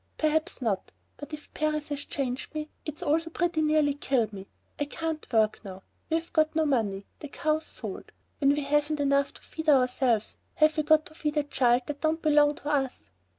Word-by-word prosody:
"Perhaps 310 Hz, -3 st, 0 dB
not. 200 Hz, -5 st, -1 dB, 0.3 s
But 290 Hz, -, -9 dB
if 300 Hz, -1 st, -9 dB
Paris 305 Hz, -1 st, -1 dB
has 285 Hz, -1 st, -3 dB
changed 260 Hz, +2 st, -3 dB
me, 305 Hz, 0 st, -4 dB, 0.2 s
it's 305 Hz, 0 st, -5 dB
also 325 Hz, +3 st, +1 dB
pretty 340 Hz, -1 st, 0 dB
near 310 Hz, 0 st, +3 dB
killed 255 Hz, -6 st, 0 dB
me. 195 Hz, 0 st, -8 dB, 0.3 s
I 290 Hz, -, +1 dB
can't 320 Hz, 0 st, -4 dB
work 220 Hz, -2 st, +2 dB
now. 190 Hz, -2 st, -9 dB, 0.3 s
We've 325 Hz, +1 st, -1 dB
got 310 Hz, 0 st, +2 dB
no 320 Hz, -1 st, +3 dB
money. 210 Hz, -8 st, 0 dB
The 295 Hz, -, -7 dB
cow's 310 Hz, +2 st, -1 dB
sold. -, -, -7 dB, 0.3 s
When 275 Hz, -, +4 dB
we 295 Hz, -, -1 dB
haven't 295 Hz, +1 st, +1 dB
enough 280 Hz, 0 st, +2 dB
to -, -, -13 dB
feed 320 Hz, -1 st, -3 dB
ourselves, 250 Hz, -5 st, +2 dB, 0.2 s
have 310 Hz, 0 st, +4 dB
we 310 Hz, -, +2 dB
got 310 Hz, +1 st, +4 dB
to -, -, -13 dB
feed 300 Hz, -1 st, -2 dB
a 295 Hz, -, +3 dB
child 250 Hz, -3 st, +2 dB
that 290 Hz, -1 st, -6 dB
don't 315 Hz, +1 st, +1 dB
belong 295 Hz, -2 st, +4 dB
to 290 Hz, -, -6 dB
us?" 270 Hz, -, -1 dB
295 Hz, 195 wpm, -28 LUFS, 260-310 Hz, 0.3 s, When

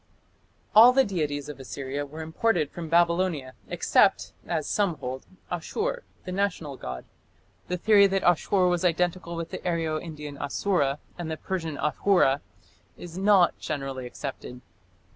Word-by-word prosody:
All 235 Hz, +4 st, +9 dB
the 270 Hz, +1 st, +5 dB
deities 150 Hz, -7 st, -2 dB
of 145 Hz, -3 st, -8 dB
Assyria 135 Hz, +2 st, -5 dB
were 155 Hz, +3 st, -7 dB
imported 160 Hz, -1 st, 0 dB
from 165 Hz, -2 st, -7 dB
Babylonia 170 Hz, -5 st, +2 dB
except, -, -, +2 dB
as 155 Hz, -, -1 dB
some 200 Hz, -5 st, +1 dB
hold, 130 Hz, +1 st, -6 dB, 0.2 s
Ashur, 435 Hz, -, -2 dB, 0.2 s
the 185 Hz, -, -5 dB
national 180 Hz, -7 st, -2 dB
god. 65 Hz, -, -7 dB, 0.6 s
The 180 Hz, -, -2 dB
theory 200 Hz, +1 st, +6 dB
that 195 Hz, 0 st, -1 dB
Ashur 180 Hz, +3 st, +3 dB
was 175 Hz, -1 st, +1 dB
identical 175 Hz, 0 st, 0 dB
with 165 Hz, -1 st, -5 dB
the -, -, -4 dB
Aryo 165 Hz, -3 st, -1 dB
Indian 150 Hz, -4 st, -8 dB
Asura 145 Hz, -1 st, 0 dB, 0.2 s
and 170 Hz, -2 st, -4 dB
the 160 Hz, -, -3 dB
Persian 165 Hz, -5 st, -4 dB
Ahura 150 Hz, -3 st, +2 dB, 0.6 s
is 170 Hz, -1 st, -9 dB
not 195 Hz, -3 st, +4 dB
generally 135 Hz, -4 st, -4 dB
accepted. 125 Hz, -1 st, -7 dB
165 Hz, 140 wpm, -26 LUFS, 145-185 Hz, 0.6 s, All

